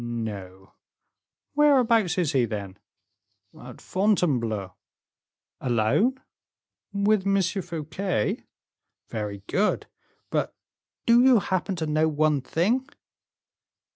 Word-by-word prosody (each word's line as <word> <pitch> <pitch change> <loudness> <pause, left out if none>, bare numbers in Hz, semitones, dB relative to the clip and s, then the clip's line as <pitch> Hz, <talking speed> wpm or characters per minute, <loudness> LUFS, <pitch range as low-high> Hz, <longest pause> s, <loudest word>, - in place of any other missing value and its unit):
"No." 100 -5 -6 0.8
"Whereabouts 235 - +4
is 170 -5 +1
he, 130 -5 +2
then?" 100 -3 -6 0.8
"At - - -11
Fontainebleau." 125 - 0 0.9
"Alone?" 125 - +1 0.7
"With 200 0 +1
M. 195 0 +3
Fouquet." 175 - -2 0.7
"Very 105 -3 -5
good. 205 - 0 0.5
But - - -1 0.5
do 235 +1 +6
you 255 -1 +6
happen 190 -1 -1
to 165 -2 -3
know 155 +1 +2
one 150 -2 +1
thing?" 230 - 0
165 Hz, 90 wpm, -25 LUFS, -, 0.9 s, do